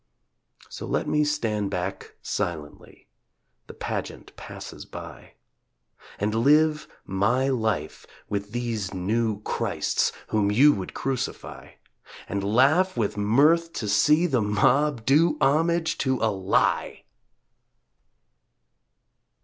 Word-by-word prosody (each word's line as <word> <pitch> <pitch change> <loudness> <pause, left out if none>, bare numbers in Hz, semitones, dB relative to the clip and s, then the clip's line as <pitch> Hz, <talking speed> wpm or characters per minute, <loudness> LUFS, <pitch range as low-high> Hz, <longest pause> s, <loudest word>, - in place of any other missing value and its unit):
So - - -8
let - - -1
me 150 0 +2
stand 115 -9 -1
back 95 0 -5
silently, 80 -4 -5 0.6
The - - -11
pageant - - -6
passes - - -9
by, - - -11 0.8
And 105 +2 -1
live 150 +6 +3 0.2
my 115 +8 +1
life 110 - -2 0.2
with 100 0 -4
these 115 -5 -3
new 105 +3 -1
Christs - - -1 0.2
Whom 105 -2 +1
you 140 +8 +6
would 95 -2 -6
crucify, 135 -2 -5 0.5
And 100 -1 -3
laugh 135 - +3
with 110 -3 -1
mirth 150 +11 +3
to 110 - -4
see 150 - +3
the 130 -9 +1
mob 125 +5 +1
Do 150 +3 +3
homage 165 +4 +1
to 130 -1 +1
a 110 - +1
Lie! 95 -1 0
115 Hz, 110 wpm, -25 LUFS, 100-150 Hz, 0.8 s, you